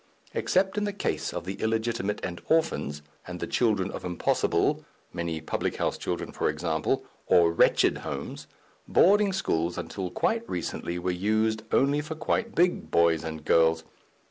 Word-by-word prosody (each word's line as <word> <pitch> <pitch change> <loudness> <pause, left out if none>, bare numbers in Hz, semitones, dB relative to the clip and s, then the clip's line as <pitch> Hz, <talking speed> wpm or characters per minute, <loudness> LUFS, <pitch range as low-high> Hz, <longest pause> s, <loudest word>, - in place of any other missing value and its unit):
Except 190 +2 +1
in - - -2
the 205 - -2
case - - -2
of - - -5
the 95 +2 -5
illegitimate 110 -2 -1
and 85 -1 -6
orphans, 155 - +1 0.2
and 90 0 -6
the - - -2
children 105 -6 +1
of - - -7
impossible 90 -1 +1 0.3
(many 85 -2 -3
public 80 - -2
house - - -1
children, - - -4
e.g.), 75 +3 -2 0.6
or 85 -1 +5
wretched 85 - +3
homes, - - -6 0.4
boarding 205 +2 +5
schools 85 - -1
until 95 -2 -4
quite 230 - -1
recently 85 0 -3
were 90 +1 -1
used 110 +4 +1
only 140 +2 +3
for 155 +1 -6
quite 225 +8 -1
big 175 +1 +2
boys 85 -1 +3
and 80 -1 -6
girls. 80 0 +4
95 Hz, 150 wpm, -27 LUFS, -, 0.6 s, or